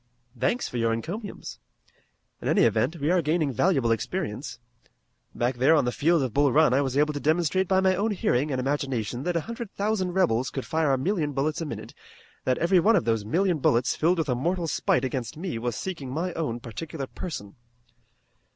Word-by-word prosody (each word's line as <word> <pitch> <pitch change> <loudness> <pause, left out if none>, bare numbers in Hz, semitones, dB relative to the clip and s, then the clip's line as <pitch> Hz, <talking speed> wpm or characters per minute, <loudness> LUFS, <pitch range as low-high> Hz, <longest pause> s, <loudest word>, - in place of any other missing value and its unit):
"Thanks 240 - 0
for 125 - -5
your 115 -1 +1
encomiums. 185 - -6 0.8
In - - -4
any - - +4
event 165 - +2
we 145 +4 +1
are 180 -1 +3
gaining 155 -2 0
valuable 135 - +2
experience. 130 - -3 0.8
Back 120 +1 0
there 135 +6 +5
on 145 -5 +3
the 125 - 0
field 160 +3 +2
of 125 -4 -3
Bull 140 -1 +3
Run 150 -1 +4
I 135 - +3
was 135 -1 -1
able 150 +1 +3
to 145 - -3
demonstrate 170 +5 +1
by 190 +1 +3
my 190 0 +3
own 205 +4 0
hearing 150 - 0
and 130 -3 -1
imagination 130 -4 -2
that 175 -1 -1
a 165 - +1
hundred 230 +3 -6
thousand 200 -3 -1
rebels 130 -10 +2
could 135 - -5
fire 160 -3 +1
a 135 - +3
million 155 0 -1
bullets 150 +4 -1
a 165 - -3
minute; - - -7 0.5
that 130 - +2
every 180 +2 +3
one 220 +7 +4
of 185 - +1
those 115 -2 +1
million 175 - +1
bullets 125 -2 +2
filled 175 +3 +2
with 160 -3 -1
a - - +3
mortal 170 +8 -1
spite 135 -4 +1
against 125 -1 -4
me 165 -8 -4
was 120 -1 -2
seeking 165 - -5
my 165 +6 -2
own 120 -8 -3
particular 135 +6 -6
person." 130 - -7
150 Hz, 205 wpm, -26 LUFS, 130-175 Hz, 0.8 s, there